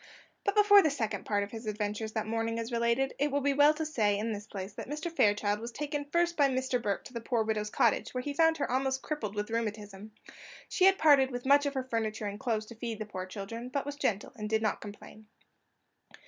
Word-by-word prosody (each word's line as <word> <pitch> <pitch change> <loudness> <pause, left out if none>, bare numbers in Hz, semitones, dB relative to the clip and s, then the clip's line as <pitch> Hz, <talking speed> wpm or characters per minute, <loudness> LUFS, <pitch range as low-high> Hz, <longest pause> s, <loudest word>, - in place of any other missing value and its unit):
But 400 - 0
before 410 -1 +8
the 315 - +2
second 230 -7 -3
part 205 -1 +1
of 200 - -7
his 225 -1 -8
adventures 210 +1 -3
that 220 - -1
morning 225 +1 -2
is 230 +1 -4
related, 235 +3 +1
it 290 +1 +2
will 285 - +1
be 285 +1 +2
as 275 - -3
well 290 +1 +7
to 315 +1 -3
say, 215 -9 +1
in 220 +2 -2
this 205 0 -6
place, 195 0 -6
that - - -8
Mr. 305 +3 -4
Fairchild 205 -7 +2
was 235 +2 -6
taken 290 +2 -3
first 340 +3 +1
by 285 -3 +4
Mr. 260 -1 -1
Burke 205 -3 -2
to 255 - -12
the 235 - -4
poor 230 -1 0
widow's 215 -1 -1
cottage, - - +1
where 250 0 -3
he 290 - -3
found 325 +2 +3
her 285 - -2
almost 265 +1 0
crippled 220 -10 -4
with 210 +1 -3
rheumatism. 210 -2 -4 0.5
She 375 - +2
had 385 0 +6
parted 285 -4 +5
with 245 -1 -6
much 285 +1 +5
of 280 - -3
her 265 - -1
furniture 225 -3 -2
and 205 0 -4
clothes 220 -3 -1
to 235 - -11
feed 230 -1 -4
the 215 - -5
poor 185 -3 -6
children, 225 +5 -6
but 275 +2 -2
was 285 0 -5
gentle 215 -8 -1
and 210 -2 -5
did 220 0 +1
not 215 - 0
complain. 210 +1 -11
230 Hz, 245 wpm, -30 LUFS, 215-285 Hz, 0.5 s, before